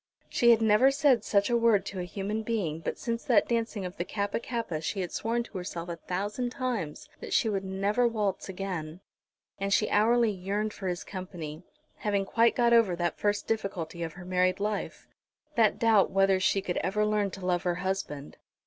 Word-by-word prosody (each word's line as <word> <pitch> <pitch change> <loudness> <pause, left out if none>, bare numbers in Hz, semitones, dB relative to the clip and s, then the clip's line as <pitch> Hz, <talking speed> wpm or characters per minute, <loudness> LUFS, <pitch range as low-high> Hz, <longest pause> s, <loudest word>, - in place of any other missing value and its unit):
She 235 - +3
had 230 -1 +6
never 220 +5 +5
said 275 -5 +3
such 200 +2 +2
a - - +3
word 230 -4 +3
to 195 - -5
a 180 - -3
human 205 +4 -3
being, 205 -9 -2
but 165 - -4
since 230 -1 -3
that - - +4
dancing 230 -4 -1
of 180 +2 -7
the - - -1
Kappa 200 +3 -2
kappa 230 -10 -3
she 190 +5 -2
had 180 - -4
sworn 235 +2 -1
to 220 - -9
herself 175 -1 -6
a 170 - -4
thousand 205 +9 -3
times 240 - -3
that - - -6
she - - +3
would 195 -3 -1
never 200 +5 +1
waltz 210 -5 -2
again. 180 -3 -5 0.6
And 195 0 -2
she 210 - +2
hourly 230 +2 +4
yearned 205 +3 -2
for 195 - -5
his 175 -1 -2
company, 175 -5 -7 0.4
having 200 -2 0
quite 230 +3 +3
got 235 -1 +3
over 225 -6 +5
that 175 -1 -2
first 205 0 0
difficulty 180 -6 -3
of 165 -2 -3
her 180 0 -11
married 185 +1 +1
life, 205 0 -3 0.5
that 225 -5 +3
doubt 225 -4 +4
whether 195 0 +3
she 195 +1 +1
could 180 -3 -2
ever 210 +3 0
learn 210 -1 +1
to 190 -1 -8
love 175 -1 +1
her 175 -1 0
husband. 180 -6 -4
200 Hz, 200 wpm, -29 LUFS, 180-225 Hz, 0.6 s, had